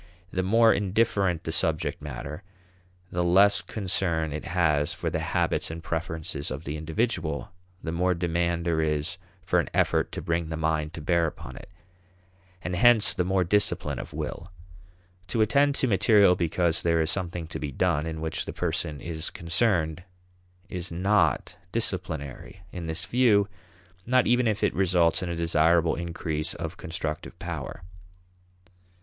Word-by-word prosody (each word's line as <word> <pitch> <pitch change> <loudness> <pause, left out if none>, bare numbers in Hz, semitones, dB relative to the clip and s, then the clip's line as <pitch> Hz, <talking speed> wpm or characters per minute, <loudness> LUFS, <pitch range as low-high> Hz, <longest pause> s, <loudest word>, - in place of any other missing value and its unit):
The 95 - 0
more 115 +4 +5
indifferent 100 -3 +1
the - - -3
subject - - 0
matter, 75 +3 -6 0.7
the 90 0 0
less 100 +4 +5
concern 90 -6 -1
it 75 - -5
has 80 -5 +1
for - - -3
the - - -1
habits - - 0
and 80 +1 -7
preferences 80 -3 -3
of 65 +4 -5
the 75 -1 -4
individual, 80 +1 -2 0.3
the 80 - -3
more 90 +2 +1
demand 85 0 -1
there 80 -2 +1
is 75 -1 -1 0.3
for - - +2
an - - -1
effort - - +2
to - - -4
bring 85 -1 -1
the 80 - -3
mind 80 0 -1
to 85 - -6
bear 85 +1 +2
upon - - -8
it - - -11 0.9
and 90 - -2
hence 120 +1 +6
the 90 - 0
more 95 +1 +1
discipline 100 +4 +1
of - - -7
will. 90 +4 -5 0.8
To 110 +5 0
attend 140 +6 +3
to 130 - +1
material 100 -2 +5
because 85 -1 +1
there 85 -1 +2
is 80 +1 +1
something 90 -3 -3
to - - -5
be 75 - -4
done 80 +1 0
in 80 -1 -5
which 80 0 -2
the - - -6
person 75 -2 -2
is 80 0 -4
concerned 85 -2 0 0.7
is 90 -1 -5
not 95 +5 +1
disciplinary 90 - -3
in 85 -2 -6
this 80 0 -2
view; 105 -1 +3 0.6
not 125 +1 +4
even 120 0 +3
if 105 -2 0
it - - +2
results 90 0 +3
in 90 - -3
a 85 - -2
desirable 85 0 +3
increase 85 -2 -3
of 85 0 -5
constructive 80 -3 -5
power. - - -6
85 Hz, 160 wpm, -27 LUFS, 80-95 Hz, 0.9 s, hence